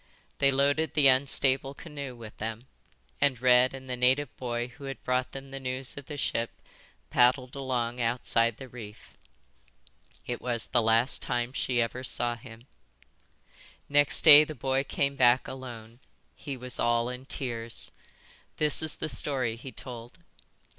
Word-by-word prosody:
They 140 - +5
loaded 140 +3 +1
the 145 -3 +6
unstable 135 +1 +2
canoe 140 -5 -8
with 115 -2 -11
them, 110 +2 -5 0.6
and 140 -4 +2
Red 125 +1 +4
and 130 0 -10
the 125 - -3
native 130 +4 +1
boy 120 -1 -3
who 140 +3 -12
had 135 0 -7
brought 125 0 0
them 135 0 -9
the 135 0 -7
news 130 0 -3
of 140 -2 -10
the 150 - -6
ship 115 -3 -2 0.5
paddled 125 +1 +3
along 125 -3 -2
outside 115 -1 +1
the 130 - -9
reef." 110 -4 -12 1.1
"It 120 - -4
was 120 -2 -1
the 120 - +1
last 115 +3 +2
time 120 +1 -2
she 125 -2 -1
ever 125 +2 -5
saw 120 -1 +1
him." 115 0 -13 1.2
"Next 145 0 +3
day 150 -2 +11
the 155 0 -7
boy 135 +2 0
came 140 0 -1
back 125 -1 +4
alone. 120 -3 -9 0.4
He 140 -3 -7
was 125 0 -7
all 120 0 +2
in 125 +1 -7
tears. 115 -4 -5 0.7
This 150 -1 +3
is 155 -1 -1
the - - -4
story 130 -3 -1
he 125 +3 -9
told. 120 -2 -9
125 Hz, 155 wpm, -28 LUFS, 120-135 Hz, 1.2 s, day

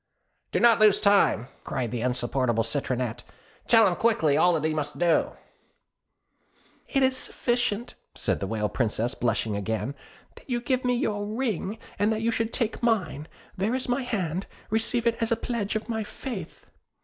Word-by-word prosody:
'Do - - +1
not 235 -2 +6
lose 215 -2 +6
time,' 200 - +3 0.2
cried 120 -4 -3
the 120 -2 -3
insupportable 120 -1 0
Citronette; 125 -1 -2 0.4
'tell 225 -2 +7
him 180 - +1
quickly 165 -11 +2
all 175 +4 +5
that 155 -1 +1
he 160 - -1
must 150 -1 -3
do.' 170 -2 +2 1.6
'It 270 -2 +2
is 260 0 +3
sufficient,' 240 -3 -1 0.2
said - - -1
the 100 - -3
Whale 105 0 -1
Princess, 120 +1 -1
blushing 115 -4 -1
again, 110 +5 -2 0.4
'that - - -17
you 240 -1 0
give 255 +1 0
me 250 0 +2
your 205 -5 -1
ring, 220 -3 -2 0.2
and 205 +2 +3
that 220 0 -1
you 230 - +2
should 225 0 -1
take 230 -3 -2
mine; 185 - 0 0.3
there 205 +6 0
is 260 - -2
my 245 +2 +1
hand, 190 -8 -2 0.2
receive 225 +2 +1
it 230 -1 +2
as 230 - 0
a - - +5
pledge 225 -3 -2
of 220 - -2
my 220 -2 -2
faith.' 210 - -7
205 Hz, 175 wpm, -26 LUFS, -, 1.6 s, tell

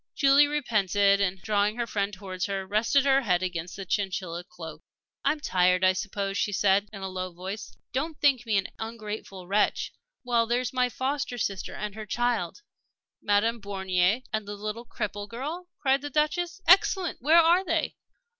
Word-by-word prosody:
Julie 280 +1 +6
repented, 205 - +2
and, 190 -1 0
drawing 210 0 +1
her 240 0 -1
friend 200 -3 -1
towards 190 -2 -4
her, 195 -1 -3
rested 225 +8 +2
her 270 0 +4
head 185 -7 +1
against 175 -1 -4
the 195 - -6
chinchilla 185 -3 -2
cloak. 175 -3 -10 0.4
"I'm 305 - +1
tired, 185 -8 +2
I 185 0 +5
suppose," 195 +1 -3
she 205 - 0
said, 200 +1 +2
in 200 -2 -8
a - - -2
low 185 -1 -4
voice. 190 +5 -7 0.2
"Don't 300 +4 -2
think 275 -4 +3
me 215 -2 +2
an 195 - -1
ungrateful 215 -4 -6
wretch. 200 +3 +1 0.3
Well, 235 -2 +2
there's 245 0 0
my 250 -1 +2
foster 260 0 -2
sister 195 -4 -3
and 210 -1 -4
her 215 0 -8
child." 240 - -1 0.6
"Madame 215 +3 +1
Bornier 190 +2 +1
and 215 -2 -2
the 205 - -5
little 215 +3 -5
cripple 205 -2 -4
girl?" 300 +10 -5
cried 270 -1 +2
the 290 - -5
Duchess. 335 +6 0
"Excellent! 375 - +4
Where 310 +6 +5
are 340 +3 +6
they?" 330 -3 0
210 Hz, 175 wpm, -27 LUFS, 195-260 Hz, 0.6 s, Julie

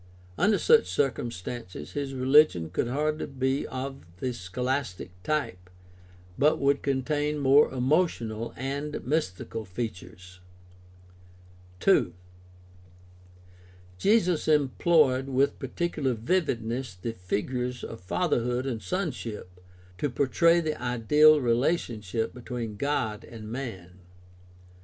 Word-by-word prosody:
Under 205 - +3
such 460 0 +4
cir 140 -2 +2
cumstances 110 -7 -7
his 140 -2 -4
religion 130 - +4
could - - -1
hardly 150 +4 -1
be 135 0 -1
of 135 +1 -6
the 125 +5 -2
scholastic 120 0 -3
type, 90 -11 -2 0.7
but 150 +2 +4
would 140 0 +2
contain 145 +2 0
more 140 +1 +5
emotional 125 -5 0
and 140 +3 -4
mystical 115 - -2
features. 90 -3 -7 1.4
2. 95 - +3 1.8
Jesus 195 -6 +2
employed 145 -2 +3
with 135 +1 +1
particular 140 -1 -2
vividness 120 - -1
the 115 +6 -5
figures 125 +6 -3
of 115 - -7
fatherhood 125 - 0
and 120 -5 -3
sonship 115 - -4 0.4
to 145 - 0
portray 155 +7 +3
the 155 -4 -3
ideal 150 +6 +5
relationship 115 - 0
between 120 -3 -5
God 110 -4 -1
and 110 -2 -9
man. 95 -9 -7
130 Hz, 100 wpm, -27 LUFS, 115-150 Hz, 1.8 s, more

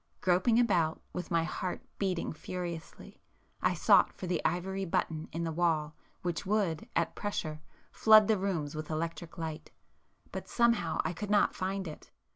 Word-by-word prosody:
Groping 185 +6 +3
about, 170 -10 +2
with 180 - -4
my 165 -1 +2
heart 180 +2 -3 0.2
beating 185 -5 -1
furiously, 170 0 -7 0.4
I - - +2
sought - - +5
for - - -8
the 180 -1 -1
ivory 190 +3 -1
button 160 -3 -1
in 170 - -3
the 165 - -1
wall 160 -2 +1 0.3
which 175 -3 -2
would, 200 -1 0
at - - +1
pressure, 155 -7 -3 0.3
flood 215 -1 +7
the 215 -3 +3
rooms 170 -7 -1
with 155 -1 -5
electric 165 +1 -4
light, 160 -2 -5 0.6
but - - -6
somehow 230 -9 +2
I 160 - 0
could 205 +4 -5
not 205 -1 +4
find 190 0 -2
it. 155 - -9
175 Hz, 160 wpm, -31 LUFS, 160-195 Hz, 0.6 s, flood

